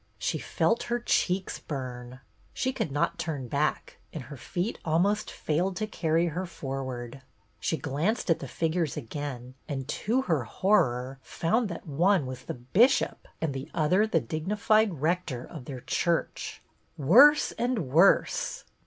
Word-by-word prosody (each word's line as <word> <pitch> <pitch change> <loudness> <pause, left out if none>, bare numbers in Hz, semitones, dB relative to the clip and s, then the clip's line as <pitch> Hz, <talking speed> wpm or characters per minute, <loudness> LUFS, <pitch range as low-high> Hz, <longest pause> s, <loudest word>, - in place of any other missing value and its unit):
She - - -1
felt 230 - +1
her 240 0 +1
cheeks 190 -5 0
burn. 125 -3 -6 0.3
She 260 0 0
could 160 - -2
not 145 +2 0
turn 145 -6 -3
back 145 +5 -1
and 155 - -6
her 140 +4 -9
feet 175 - -3
almost 190 +7 +1
failed 180 +5 -1
to 215 - -1
carry 165 -5 +1
her 180 +4 -3
forward. 135 -4 -5 0.4
She 160 - -1
glanced 160 - -1
at 165 - +2
the 135 - -6
figures 165 +2 -1
again, 130 -2 -6 0.2
and, 135 -2 -3
to 240 - 0
her 160 - +1
horror, 130 - +1
found 215 - 0
that 170 - -7
one 165 +2 +2
was 130 0 -7
the - - -4
Bishop 185 - +2
and 160 -4 -1
the 135 0 -6
other 180 +7 +3
the 170 -7 +2
dignified 190 - +1
rector 165 -7 0
of 150 -7 -10
their 130 -2 -7
church. 170 +5 -1 0.3
Worse 250 - +6
and 235 - -1
worse 170 +7 +3
160 Hz, 150 wpm, -28 LUFS, 135-195 Hz, 0.4 s, Worse